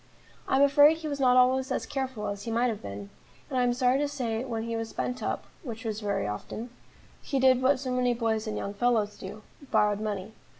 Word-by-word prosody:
I - - +2
am 275 - +5
afraid 290 +3 +6
he 320 -1 -6
was 285 -2 -3
not 255 -2 +4
always 260 +1 +3
as - - -1
careful 260 -6 -3
as 200 0 -4
he 230 - -5
might 240 +2 +2
have 215 -3 -4
been, 100 0 -8 0.4
and 260 - +1
I - - +3
am 245 0 +3
sorry 250 +2 +2
to 290 - +1
say 245 -5 -2
when 230 -4 -3
he 230 0 -3
was 225 0 -3
spent 250 0 -3
up - - -2 0.2
which 235 - -7
was 215 -1 -3
very 200 -2 -1
often 215 - -5 0.5
he 275 - -1
did 260 -1 +5
what 260 +1 +3
so 260 -1 -3
many 250 -1 +1
boys 225 -1 -1
and 215 - -3
young 200 - -4
fellows 215 -1 +1
do, 205 +3 -9 0.3
borrowed 210 -2 +2
money. 210 -1 -4
240 Hz, 230 wpm, -28 LUFS, 215-260 Hz, 0.5 s, afraid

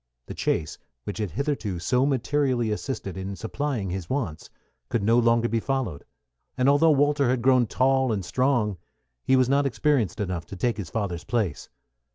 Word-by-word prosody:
The - - -7
chase, 75 - -2 0.2
which 105 - -5
had 105 -3 -1
hitherto 115 - -2
so 125 +10 +1
materially 130 -3 +1
assisted 105 -4 -4
in 95 +1 -5
supplying 115 -3 -3
his 90 -2 -5
wants, 105 - -3 0.4
could 115 - 0
no 115 +3 +4
longer 115 0 +3
be 115 0 0
followed; 120 - -3 0.5
and 130 +1 +2
although 145 +4 +5
Walter 145 -2 +3
had 125 -2 0
grown 130 -2 +4
tall 130 +1 +2
and 100 -4 -2
strong, 110 0 +1 0.5
he 130 - +3
was 130 -1 +4
not 140 +1 +2
experienced 130 - 0
enough 90 -5 -3
to - - -8
take 120 +5 -1
his 100 -6 -5
father's 95 -6 -3
place. 110 -10 -2
120 Hz, 175 wpm, -25 LUFS, 100-135 Hz, 0.5 s, although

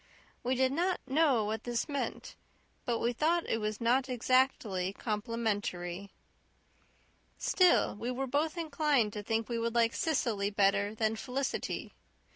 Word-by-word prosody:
We 255 +2 0
did 260 +1 +2
not 355 +5 0
know 270 -5 +3
what 220 +1 -3
this 240 -2 -2
meant, 280 -2 -4 0.5
but 240 -4 0
we 235 +2 0
thought 330 +6 +1
it 225 - 0
was 215 -1 -3
not 250 +3 +2
exactly 245 -7 +1
complimentary. 205 -4 -3 1.3
Still, 365 -2 +3
we 235 +4 -4
were 255 +2 -2
both 300 +6 -1
inclined 295 -8 +1
to 210 - -4
think 225 +1 -1
we 235 -1 -2
would 230 0 -2
like 230 -1 +3
Cecily 230 -10 0
better 200 +1 +2
than 220 0 0
Felicity. 260 +4 -3
235 Hz, 140 wpm, -31 LUFS, 210-270 Hz, 1.3 s, know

